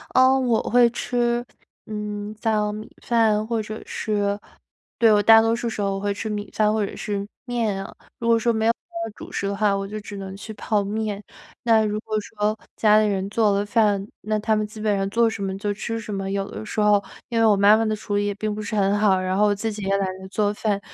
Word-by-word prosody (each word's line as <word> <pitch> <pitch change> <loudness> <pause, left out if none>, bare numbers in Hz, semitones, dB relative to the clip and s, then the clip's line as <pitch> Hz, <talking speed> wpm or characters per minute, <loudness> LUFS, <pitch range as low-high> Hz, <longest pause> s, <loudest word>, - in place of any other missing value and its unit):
呃， 260 +1 +6
我 240 -3 +2
会 245 0 +4
吃， 240 0 0 0.4
嗯， 210 0 -5
像 210 -2 0
米 215 - -7
饭 220 -2 +2
或 230 -1 0
者 215 +1 -7
是 205 -1 -1 0.6
对， 225 -2 +6
我 205 -1 +5
大 225 0 +8
多 225 +1 +2
数 235 0 -3
时 215 -2 -3
候， 195 -1 0
我 - - -3
会 205 0 -1
吃 220 +2 -5
米 205 -1 -4
饭 210 -1 +3
或 215 -2 +1
者 - - -7
是 200 -1 -3 0.2
面 225 -6 -1
啊。 - - -9 0.3
如 230 - -3
果 230 0 +5
说 235 +1 +1
没 220 0 +1
有 - - +6 0.4
主 - - -10
食 200 - -2
的 200 - -2
话， 205 -1 +2
我 195 0 -3
就 215 +1 -5
只 205 -1 -8
能 195 0 -7
去 220 +2 -8
泡 210 -1 0
面。 210 0 -3 0.4
那 225 -2 +4
如 210 0 -1
果 220 -1 -4
说 210 0 -2 0.2
家 215 -1 +5
里 215 - +3
人 195 -1 -1
做 215 -2 +3
了 200 +1 0
饭， 205 -2 +2
那 215 0 -1
他 215 +1 +1
们 210 0 -1
基 215 +1 -11
本 210 -1 +1
上 195 0 -1
做 230 +2 +3
什 220 -3 -3
么 190 0 -3
就 205 +1 -2
吃 225 +2 -4
什 215 - -7
么。 195 -1 -3
有 195 0 -2
的 - - -7
时 215 0 -4
候， 210 -1 +4 0.3
因 230 -1 0
为 - - +4
我 210 -2 +5
妈 200 +2 +7
妈 225 - +1
的 215 -1 0
厨 205 -1 -4
艺， 205 0 +1
也 200 - -2
并 215 0 -2
不 215 - -5
是 210 - -4
很 200 -1 +2
好， 195 -3 +4
然 185 0 -1
后 210 +1 +4
我 205 - +2
自 220 +2 -2
己 210 - -7
也 195 +1 +1
懒 195 - 0
得 190 - -9
做 205 +1 0
饭， 205 -1 -1
210 Hz, 270 characters per minute, -23 LUFS, 200-220 Hz, 0.6 s, 大